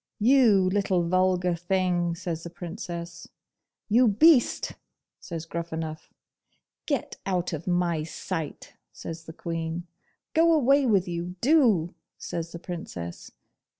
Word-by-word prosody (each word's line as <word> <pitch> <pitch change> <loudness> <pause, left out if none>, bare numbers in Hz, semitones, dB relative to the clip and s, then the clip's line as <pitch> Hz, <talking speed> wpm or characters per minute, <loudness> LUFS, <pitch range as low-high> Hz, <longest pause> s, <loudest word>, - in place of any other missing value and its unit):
'You 220 -5 +5
little 185 -3 +1
vulgar 185 0 +2
thing!' 175 -1 0
says 165 -1 -4
the 170 - -7
Princess. 170 -1 -7 0.6
'You 235 +3 +5
beast!' 250 +6 +4 0.5
says 165 -2 -6
Gruffanuff. 165 -2 -5 0.8
'Get 285 -5 -2
out 180 -2 -1
of 160 +2 -5
my 175 -3 +1
sight!' 160 0 -5 0.2
says 165 0 -8
the 160 - -9
Queen. 165 0 -4 0.5
'Go 330 +1 +5
away 275 -2 +4
with 195 -5 +3
you, 175 +1 -4
do!' 230 - +3 0.2
says 170 0 -5
the 170 - -6
Princess. 165 - -7
175 Hz, 115 wpm, -26 LUFS, 170-200 Hz, 0.8 s, You